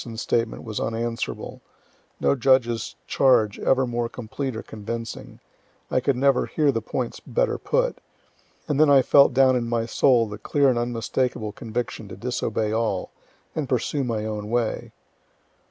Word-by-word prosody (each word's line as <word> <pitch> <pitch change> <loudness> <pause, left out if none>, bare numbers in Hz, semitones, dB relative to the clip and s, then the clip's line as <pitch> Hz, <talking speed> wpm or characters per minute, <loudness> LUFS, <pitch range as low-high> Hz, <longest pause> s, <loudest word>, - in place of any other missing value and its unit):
's 115 -2 -7
statement 115 -1 -1
was 110 -3 -4
unanswerable, 115 0 -3 0.6
no - - +3
judge's 120 -3 +2
charge 110 -6 +3
ever 130 0 +2
more 120 -1 -2
complete 125 +2 -5
or 110 - -5
convincing, 115 +1 -7 0.5
I - - +3
could 130 +1 +1
never 135 +1 +2
hear 150 -3 +2
the 115 -3 -2
points 120 +2 -4
better - - -1
put - - 0 0.7
and 145 -3 0
then 155 -1 +6
I 135 -2 +6
felt 140 +1 +6
down 130 0 +4
in 120 -2 -1
my 115 -1 0
soul 120 0 +3
the 105 0 -8
clear 140 +4 +2
and 120 -2 +1
unmistakable 120 -1 -2
conviction 110 0 -5
to - - -9
disobey 115 -3 -2
all, 110 -4 -1 0.4
and 150 -5 -3
pursue 135 +3 0
my 110 -4 -2
own 105 -1 -4
way. 120 -1 -1
120 Hz, 155 wpm, -24 LUFS, 115-130 Hz, 0.7 s, then